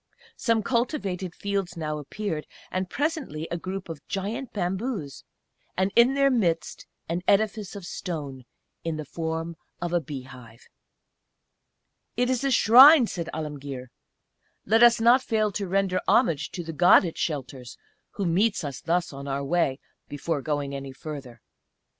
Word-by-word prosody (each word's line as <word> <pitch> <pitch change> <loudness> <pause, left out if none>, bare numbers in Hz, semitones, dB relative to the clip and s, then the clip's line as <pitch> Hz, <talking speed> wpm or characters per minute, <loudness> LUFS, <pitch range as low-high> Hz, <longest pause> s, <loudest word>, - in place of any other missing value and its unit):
Some 230 -2 +1
cultivated 200 - -2
fields 195 -3 -3
now 155 -2 -3
appeared, 160 +1 -4 0.2
and 185 0 -2
presently 285 - -2
a - - 0
group 185 +2 -5
of 160 -3 -8
giant 220 +7 -4
bamboos, 190 - -3 0.5
and 190 +2 +1
in 240 +3 +5
their 275 0 +4
midst 170 -10 -1 0.2
an 170 +2 -2
edifice 210 0 +1
of 200 -3 -8
stone, 145 -9 -6 0.4
in 165 -2 -2
the 155 - -5
form 165 +2 -4 0.2
of 175 0 -3
a 175 - +2
bee 140 -3 -7
hive. 125 -3 -14 1.5
"It 250 +1 +2
is 255 0 -1
a 275 - +2
Shrine," 260 +4 +8
said 170 -6 -5
Alemguir. 140 -5 -6 0.7
"Let 225 +3 +3
us 240 -1 +7
not 240 +3 +5
fail 215 -4 0
to 200 0 -3
render 190 0 +1
homage 165 - +3
to 175 - -4
the 165 0 -6
God 175 +3 +6
it 165 - -5
shelters, 130 -5 -4 0.4
who 200 - -3
meets 195 +5 +1
us 140 -3 -5
thus 170 -1 0
on 140 +1 -8
our 140 0 -2
way, 140 -2 +1 0.3
before 145 +1 -2
going 145 -1 -2
any 135 -1 -6
further. 130 -5 -8
175 Hz, 155 wpm, -26 LUFS, 150-215 Hz, 1.5 s, Shrine